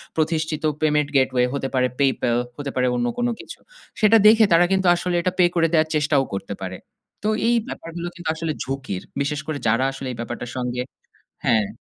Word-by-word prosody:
প্রতিষ্ঠিত 160 -1 -1 0.2
payment 150 -1 +2
gateway 130 -2 +3
হতে 140 -1 -2
পারে 125 0 +3
PayPal 130 -3 +2 0.2
হতে 145 -2 -4
পারে 125 0 +2
অন্য 120 0 0
কোন 245 - +1
কিছু। - - -10 0.4
সেটা 220 +1 +6
দেখে 220 +1 +7
তারা 170 +1 +6
কিন্তু 190 -1 +2
আসলে 175 0 -2
এটা 185 - 0
pay 175 -1 +6
করে 165 -1 +3
দেওয়ার 155 -1 +3
চেষ্টাও 150 -2 +2
করতে 100 +1 -5
পারে। 95 0 -5 0.5
তো 215 - +1 0.2
এই 240 - +4
ব্যাপারগুলো 170 -6 -6
কিন্তু 175 -2 -5
আসলে 160 -1 -2
ঝুঁকির। 130 -9 -4 0.2
বিশেষ 145 +1 -1
করে 155 - -2
যারা 115 +4 +3
আসলে 135 0 -7
এই 120 - -7
ব্যাপারটার 120 0 -5
সঙ্গে 125 0 -2 0.6
হ্যাঁ। 110 -3 +3
145 Hz, 190 wpm, -22 LUFS, 125-165 Hz, 0.6 s, দেখে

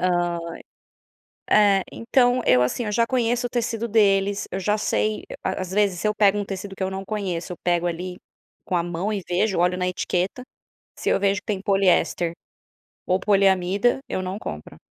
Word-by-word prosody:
Hã, 175 -1 +1 1.1
eh, 200 -2 +5
então, 245 +1 +2
eu, 125 0 +5
assim, 125 - -1
eu 210 - -2
já 230 +2 +2
conheço 245 -1 0
o - - -7
tecido 235 -1 -1
deles, 200 -2 +2
eu - - -3
já 210 +3 +1
sei 215 0 -1 0.2
a 190 - -2
às 185 -1 -4
vezes, 200 -3 +1
se 215 - +1
eu 210 - 0
pego 205 -1 +4
um 205 - -1
tecido 195 0 -6
que - - -5
eu 190 - -1
não 190 0 -5
conheço, 190 -5 -3
eu - - -7
pego, 175 -1 +1
ali, 180 +1 -4 0.5
com 180 - -1
a 170 - +2
mão 175 +4 -3
e 200 -2 -3
vejo, 185 +2 +1
olho 180 +1 +2
na 180 0 -1
etiqueta, 180 +5 -2 0.6
se - - -2
eu - - +3
vejo 200 -1 +1
que - - -54
tem 205 -3 -2
poliéster 195 -3 +2 0.8
ou 185 +1 +2
poliamida, 195 +3 +2
eu - - -2
não 185 +1 -4
compro, 75 - -8
195 Hz, 195 wpm, -23 LUFS, 180-210 Hz, 1.1 s, eh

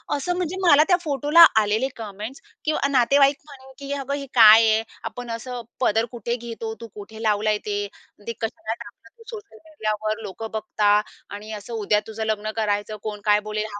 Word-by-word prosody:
असं, 320 +6 -2
म्हणजे 360 0 -2
मला 300 -2 +7
त्या 360 - +4
फोटोला 295 +3 +6 0.2
आलेले 215 +5 0
कमेंट्स 215 +3 -8 0.2
किंवा 305 -2 +1
नातेवाईक 275 +2 +4
म्हणे 265 -3 -14
की 280 0 -7
"अगं 275 +1 -4
हे 280 0 -4
काय 225 -1 +8
आहे? 220 +1 +2 0.2
आपण 245 -1 -7
असं 240 +2 -5 0.2
पदर 225 -2 +2
कुठे 235 -1 -3
घेतो, 230 -2 -6
तू 230 - -7
कुठे 220 +2 -10
लावलंय 215 0 +1
ते? 205 -1 -2 0.4
ते 230 - -2
कशाला 225 0 -3
टाकलं 235 - -14
तू 455 - -16
सोशल 415 - -10
मीडियावर, 215 -7 -3
लोकं 215 +2 -7
बघता 210 -1 +2 0.3
आणि 210 +2 -8
असं 210 +2 -8
उद्या 210 -1 +1
तुझं 220 0 -5
लग्न 215 0 -2
करायचं 215 -1 -1
कोण 210 -1 -5
काय 210 0 +4
बोलेल?" 215 0 -2
225 Hz, 180 wpm, -23 LUFS, 215-270 Hz, 0.4 s, काय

